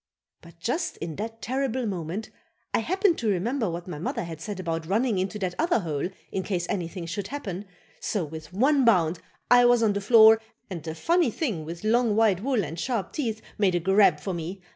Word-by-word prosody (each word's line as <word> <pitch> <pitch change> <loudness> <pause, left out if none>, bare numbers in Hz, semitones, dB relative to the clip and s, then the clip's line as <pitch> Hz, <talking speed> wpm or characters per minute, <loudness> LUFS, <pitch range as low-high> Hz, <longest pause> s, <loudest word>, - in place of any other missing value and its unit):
But 170 0 -16
just 245 - -2
in 165 -2 -6
that 225 +2 -6
terrible 260 -1 -1
moment 185 +1 -4 0.4
I - - +3
happened 370 - +1
to 225 - 0
remember 220 +4 0
what 170 +1 -5
my 155 -5 -6
mother 170 - -2
had 165 -2 -7
said 205 +1 -5
about 165 -2 -3
running 215 +1 +1
into 190 +2 -2
that 185 -3 -2
other 330 - +2
hole 155 -1 -2 0.2
in 190 - -1
case 180 -2 -2
anything 175 -2 -3
should 185 +4 -4
happen, 205 -8 -5 0.3
so 200 -6 -1
with 155 +1 -9
one 270 +8 +3
bound 180 -7 +3 0.3
I 245 0 +8
was 240 -1 +5
on 210 -2 +3
the 200 - -2
floor 220 +1 +7 0.3
and 170 -3 -4
the 160 0 -6
funny 335 - +2
thing 215 - -3
with 170 +3 -7
long, 225 0 +2
white 210 -4 +3
wool 250 -3 +1
and 160 +3 -6
sharp 230 -1 -2
teeth 225 -8 -3 0.2
made 190 -4 +3
a - - +2
grab 190 -2 +4
for 185 +5 -4
me. 175 +3 -5
200 Hz, 205 wpm, -26 LUFS, 170-235 Hz, 0.4 s, I